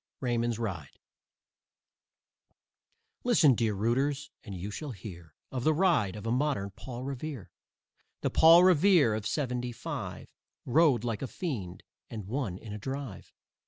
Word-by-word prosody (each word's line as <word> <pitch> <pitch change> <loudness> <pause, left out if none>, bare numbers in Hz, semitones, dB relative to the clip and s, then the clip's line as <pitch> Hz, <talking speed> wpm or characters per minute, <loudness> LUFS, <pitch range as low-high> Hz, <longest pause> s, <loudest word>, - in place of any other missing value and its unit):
RAYMOND'S 120 -2 0
RIDE 95 -11 -5 2.3
Listen, 180 - +5
dear 110 -3 0
rooters, 135 +7 0
and 100 -3 -7
you 95 +3 -5
shall 145 +4 -5
hear 85 -6 -10 0.2
Of 130 -2 -3
the 155 +2 +3
ride 155 - +2
of 105 0 -8
a 115 - 0
modern 125 -6 0
Paul 120 +5 -8
Revere. 135 -3 -6 0.7
The - - 0
Paul 165 +2 +8
Revere 180 - +5
of 105 0 -2
"seventy 125 -1 -2
five" 115 - -6 0.4
Rode 135 -3 +4
like 115 -3 -2
a 135 - -2
fiend 105 - -5 0.3
and 110 -4 -6
won 110 -4 -3
in 105 +1 -9
a 105 - -6
drive. 135 -1 -6
120 Hz, 140 wpm, -30 LUFS, 105-145 Hz, 2.3 s, Paul